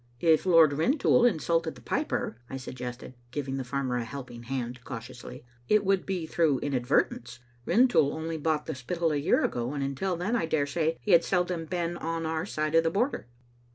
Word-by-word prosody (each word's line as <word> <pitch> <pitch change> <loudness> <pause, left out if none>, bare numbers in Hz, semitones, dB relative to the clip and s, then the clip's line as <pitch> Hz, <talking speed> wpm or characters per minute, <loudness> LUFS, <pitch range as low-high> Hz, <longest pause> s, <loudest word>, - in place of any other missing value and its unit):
"If 160 +3 +3
Lord 165 -4 +6
Rintoul 245 - +3
insulted 165 - +1
the 125 - -14
piper," 115 - -2
I 135 - -4
suggested, 125 -1 -7 0.2
giving 135 +1 -3
the 135 - -2
farmer 130 0 -2
a 120 - -1
helping 120 -1 -8
hand 125 0 -4
cautiously, 125 +1 -9
" 120 0 -32
it 210 -1 +4
would 195 -1 +1
be 185 -4 -2
through 160 -3 +2
inadvertence. 125 -3 0 0.3
Rintoul 235 - +4
only 160 +1 -4
bought 155 -1 0
the 160 - -3
Spittal 165 +5 -1
a 150 - 0
year 145 - +2
ago, 120 +4 -2
and 140 - -2
until 140 +7 -1
then, 180 +8 -1
I 225 - 0
daresay, 160 +1 0
he 210 - -1
hacl 170 -1 +7
seldom 180 -2 0
been 175 -1 -2
on 165 0 -3
our 160 0 -2
side 155 0 -2
of 165 0 +5
the 165 - +2
Border." 205 - -1
155 Hz, 190 wpm, -28 LUFS, 130-170 Hz, 0.3 s, hacl